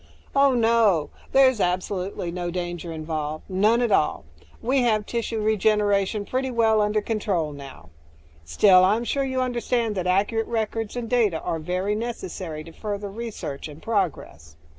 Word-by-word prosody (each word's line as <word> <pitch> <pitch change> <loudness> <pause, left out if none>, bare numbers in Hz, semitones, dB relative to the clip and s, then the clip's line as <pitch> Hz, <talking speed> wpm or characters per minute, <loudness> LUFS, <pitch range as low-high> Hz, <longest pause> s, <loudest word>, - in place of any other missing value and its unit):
"Oh, 275 -1 +5
no. 225 -8 +3 0.2
There's 260 -3 +5
absolutely 180 0 -2
no 175 0 -3
danger 175 -1 -4
involved. 155 -1 -4
None 210 +6 +2
at 235 - 0
all. 150 - +1 0.3
We 260 +3 +1
have 215 -3 +1
tissue 230 -1 -3
regeneration 210 -1 +1
pretty 260 +3 -2
well 225 -3 +3
under 210 0 +1
control 200 -8 -1
now. 135 - -11 0.5
Still, 185 - +5
I'm 210 +5 +3
sure 275 +3 -1
you 260 -1 -1
understand 240 -2 0
that 185 -3 -2
accurate 205 +5 +1
records 225 -1 -2
and 240 -2 -3
data 220 -9 +2
are 165 - -3
very 180 +5 -1
necessary 190 -8 -5
to 165 - -12
further 205 +2 -5
research 195 -11 -6
and 150 0 -11
progress." 160 - -3
205 Hz, 150 wpm, -24 LUFS, 175-230 Hz, 0.5 s, Oh